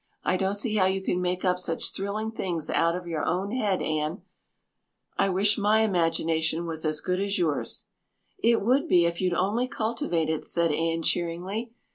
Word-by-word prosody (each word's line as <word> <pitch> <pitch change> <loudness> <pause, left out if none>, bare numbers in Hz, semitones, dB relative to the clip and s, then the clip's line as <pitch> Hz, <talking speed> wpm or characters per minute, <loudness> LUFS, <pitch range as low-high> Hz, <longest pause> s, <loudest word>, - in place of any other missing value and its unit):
"I - - +1
don't 190 +2 0
see 215 +1 0
how 185 -2 +4
you 190 0 0
can 180 -1 -1
make 180 +1 -1
up 180 0 +2
such 165 -2 -1
thrilling 210 +3 -3
things 175 -7 -3
out 170 +1 +2
of 180 0 -5
your 165 -3 -3
own 190 +4 -1
head, 210 -7 0
Anne. 155 +4 -2 0.9
I 195 - +2
wish 200 +3 +3
my 210 +2 +3
imagination 165 -4 +1
was 160 -1 -4
as 155 -1 0
good 180 0 -1
as 200 +1 0
yours." 160 -5 -1 0.5
"It 235 -9 +3
would 265 +8 +2
be 175 - +5
if 170 +1 -1
you'd 180 -2 +1
only 210 +8 +1
cultivate 215 -9 -1
it," 160 -1 -1
said 170 -2 +1
Anne 165 +2 0
cheeringly. 185 +9 -2
180 Hz, 185 wpm, -27 LUFS, 165-205 Hz, 0.9 s, be